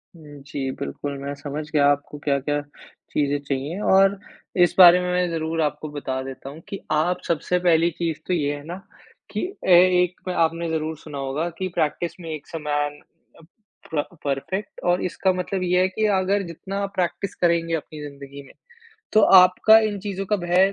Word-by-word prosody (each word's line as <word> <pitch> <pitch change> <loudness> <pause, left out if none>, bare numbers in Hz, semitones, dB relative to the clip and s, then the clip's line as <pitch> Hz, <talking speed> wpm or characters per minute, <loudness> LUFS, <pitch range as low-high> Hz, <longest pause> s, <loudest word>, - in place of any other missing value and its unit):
हुँ, 145 -3 -13
जी 140 -2 -3
बिल्कुल 140 - -5
मैं 140 +1 -4
समझ 145 +1 -5
गया 150 -3 +3
आपको 145 +1 -3
क्या-क्या 145 +1 0 0.5
चीज़ें 145 -1 +1
चाहिए 140 +6 -3
और 195 +1 +5 0.5
इस 175 - +2
बारे 180 -1 +9
में 180 0 -2
मैं 180 0 +1
ज़रूर 165 0 -2
आपको 150 0 -2
बता 135 -3 -4
देता 135 0 -8
हूँ 145 +3 -10
कि 195 - -6
आप 175 +4 +1
सबसे 170 +2 0
पहली 170 -1 +3
चीज़ 165 -3 -2
तो 185 - 0
ये 145 -4 0
है 145 - -10
ना 175 - -5 0.6
कि - - -2 0.2
ऐ 180 -2 +8 0.2
एक 180 +1 -3
आपने 165 -1 0
ज़रूर 160 0 -2
सुना 150 -1 -9
होगा 140 +5 -2
कि 185 - -1
प्रैक्टिस 155 +2 -1
मैक्स 160 -1 -7
अ - - -3
मैन 145 0 -1 0.4
अ - - -16 0.5
प 145 - +1 0.2
परफेक्ट 185 +9 -3
और 175 +1 +2
इसका 185 +2 0
मतलब 185 +1 -3
यह 180 0 +2
है 185 - +3
कि 215 +3 -1
अगर 195 +2 +1
जितना 195 +4 -4
प्रैक्टिस 180 +2 -2
करेंगे 170 -1 +1
अपनी 155 -1 -7
ज़िंदगी 140 0 -11
में - - -17 0.6
तो 215 - +6 0.2
आपका 185 +4 +6
इन 205 -1 -4
चीज़ों 195 0 -4
का 210 - +1
भय 180 +1 +2
165 Hz, 180 wpm, -23 LUFS, 145-180 Hz, 0.6 s, बारे